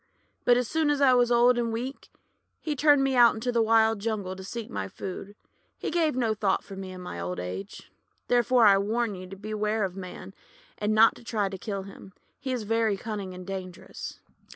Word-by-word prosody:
But 245 0 +6
as 250 -2 0
soon 320 +2 +1
as 290 -1 +1
I 270 -2 +6
was 245 -1 +3
old 240 +1 +5
and 230 -1 -1
weak 250 +5 -5 0.5
he 305 -2 -3
turned 290 -1 +5
me 270 -1 +1
out 240 -2 +6
into 235 +3 -2
the 235 -1 +2
wild 225 -1 +4
jungle 200 -3 -3
to 190 - -9
seek 225 +3 -6
my 100 -1 -4
food. 195 - -7 0.4
He - - -4
gave 320 -4 +1
no 235 -4 +1
thought 205 -2 0
for 195 - -10
me 190 -1 -7
in 185 0 -9
my 180 - -7
old 90 +1 -4
age. 90 +2 -7 0.4
"Therefore 245 0 +4
I 200 -1 +7
warn 220 +2 0
you 185 -1 -8
to 195 - -9
beware 215 +1 -2
of 190 -2 -3
Man, 185 -2 -8 0.5
and 210 +1 0
not 225 +1 +7
to - - -15
try 210 -4 -1
to 190 - -6
kill 200 -2 -4
him. 195 -1 -12 0.3
He 265 - -4
is 250 -3 -2
very 225 -1 +1
cunning 200 -3 -5
and 180 0 -9
dangerous." 185 -2 -7
215 Hz, 215 wpm, -27 LUFS, 195-240 Hz, 0.5 s, I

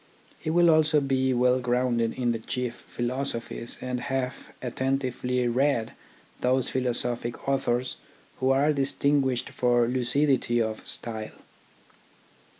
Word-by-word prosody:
He - - -4
will 170 +1 +5
also 155 -1 +4
be 130 -1 +1
well 125 0 +3
grounded 120 -2 +1
in 120 -2 0
the 115 - -2
chief 125 +1 -4
philoso 120 0 -2
phies, 115 0 -8
and 125 -1 -2
have 130 -1 -3
attentively 125 -1 -1
read 120 -1 +1 0.5
those 130 0 +1
philosophic 120 -1 -2
authors 130 -2 0 0.4
who 130 - +1
are 140 +3 +4
distinguished 135 -2 +1
for 120 -1 +3
lucidity 125 0 +1
of 110 -1 -2
style. 110 -2 -4
125 Hz, 120 wpm, -27 LUFS, 120-135 Hz, 0.5 s, will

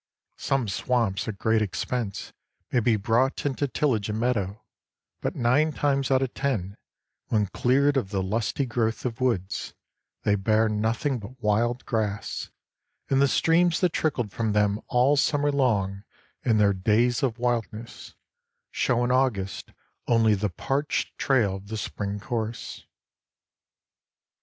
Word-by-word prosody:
Some 135 -4 0
swamps 105 -1 0
at 105 -3 -4
great 110 +2 +2
expense 110 +1 -3 0.4
may 125 - +3
be 115 -1 +3
brought 115 +8 +1
into 145 0 0
tillage 125 -7 0
and 105 +1 -2
meadow, 110 -4 -1 0.6
but - - -2
nine 135 +6 +2
times 140 -2 0
out 135 0 +3
of 130 - -3
ten, 105 -9 -2 0.5
when 105 -2 +2
cleared 135 +8 +2
of 105 -8 -1
the 95 -2 -1
lusty 110 +7 -1
growth 115 -2 -1
of 120 0 -3
woods, 100 -7 -1 0.5
they 105 - +2
bear 110 +3 +2
nothing 115 +6 0
but 120 +5 -11
wild 120 +3 0
grass, 105 -3 -2 0.6
and 135 0 +4
the 140 - +5
streams 165 +4 +3
that 180 -3 +2
trickled 125 -9 -1
from 110 -1 -1
them 105 0 +2
all 125 +4 +3
the 140 - +3
summer 145 -1 +1
long 105 -8 0 0.4
in 110 -2 +3
their 100 -1 +4
days 110 +6 +2
of 125 -5 0
wildness 115 -2 -3 0.6
show 120 -1 +1
in 120 - +1
August 125 -7 0 0.4
only 115 -2 +4
the 105 +1 0
parched 135 - -2
trail 110 -8 +2
of 95 +1 -13
the 110 +1 -4
spring 100 -1 -4
course. 115 0 -5
115 Hz, 145 wpm, -26 LUFS, 105-130 Hz, 0.6 s, the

